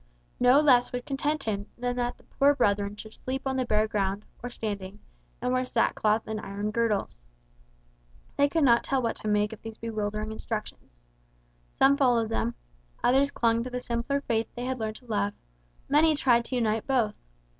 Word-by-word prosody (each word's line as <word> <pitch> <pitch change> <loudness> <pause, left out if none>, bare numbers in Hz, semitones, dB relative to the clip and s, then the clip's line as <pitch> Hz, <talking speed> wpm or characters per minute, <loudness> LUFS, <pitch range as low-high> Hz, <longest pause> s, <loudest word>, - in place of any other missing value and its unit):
No 250 +4 +6
less 250 -5 +4
would 245 0 -4
content 290 +2 -1
him 205 -2 -2
than 245 0 -2
that 245 0 -1
the - - -23
poor 285 +1 +3
brethren 205 -4 +1
should 215 +1 -10
sleep 265 +1 -5
on 265 0 0
the 260 -1 0
bare 215 -1 +2
ground, 200 -1 -1 0.2
or 245 - -4
standing; 205 -4 -5 0.4
and 250 - -1
wear 255 0 +2
sackcloth 225 -3 +1
and 215 -1 -4
iron 205 +1 -4
girdles. 210 - -1 1.1
They 285 0 +3
could 325 +1 +1
not 235 -3 +5
tell 270 - +1
what 230 - 0
to - - -5
make 210 0 +1
of 220 - -11
these 225 0 -8
bewildering 215 -1 -3
instructions. 210 - -6 0.7
Some 275 +1 +5
followed 240 -5 +3
them, 230 +1 -1 0.5
others 270 +3 +4
clung 230 -4 +1
to 255 - -5
the 250 0 -3
simpler 245 +3 -2
faith 230 -4 0
they 245 0 -4
had 260 0 -2
learned 220 -1 -3
to 250 - -14
love, 205 -3 -1 0.5
many 310 +2 +4
tried 240 -5 +3
to 255 - -4
unite 220 -2 0
both. 240 -6 +2
235 Hz, 185 wpm, -27 LUFS, 215-255 Hz, 1.1 s, No